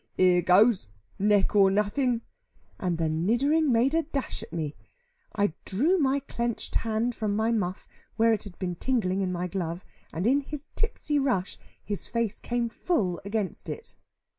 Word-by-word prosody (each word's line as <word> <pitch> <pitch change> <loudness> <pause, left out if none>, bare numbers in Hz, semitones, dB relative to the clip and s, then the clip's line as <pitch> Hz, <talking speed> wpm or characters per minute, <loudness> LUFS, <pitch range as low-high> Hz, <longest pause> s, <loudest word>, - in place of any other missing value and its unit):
"Here 180 -1 +5
goes, 185 - +4 0.3
neck 205 0 +3
or 195 -1 +6
nothing;" 225 +5 +1 0.6
and 180 -3 -1
the 165 -1 0
niddering 240 - +2
made 245 +5 +3
a 330 - +3
dash 285 -7 -4
at 225 - -10
me. 155 -3 -3 0.6
I 205 -5 +1
drew 310 - +2
my 275 -1 +2
clenched 235 -4 -3
hand 225 +2 0
from 215 -3 -1
my 220 +2 +1
muff, 190 -4 -2 0.3
where 225 +1 +4
it 215 - -1
had 195 -4 -10
been 180 -2 -2
tingling 195 -2 0
in 185 -1 0
my 180 0 -2
glove, 180 -1 -4 0.3
and 170 +4 -3
in 270 +5 +4
his 295 +1 -7
tipsy 300 -9 0
rush, 240 -10 0 0.2
his 205 -2 -4
face 230 -3 -1
came 240 -1 -1
full 215 - -1
against 200 -1 -3
it. 460 - -7
215 Hz, 165 wpm, -27 LUFS, 185-250 Hz, 0.6 s, or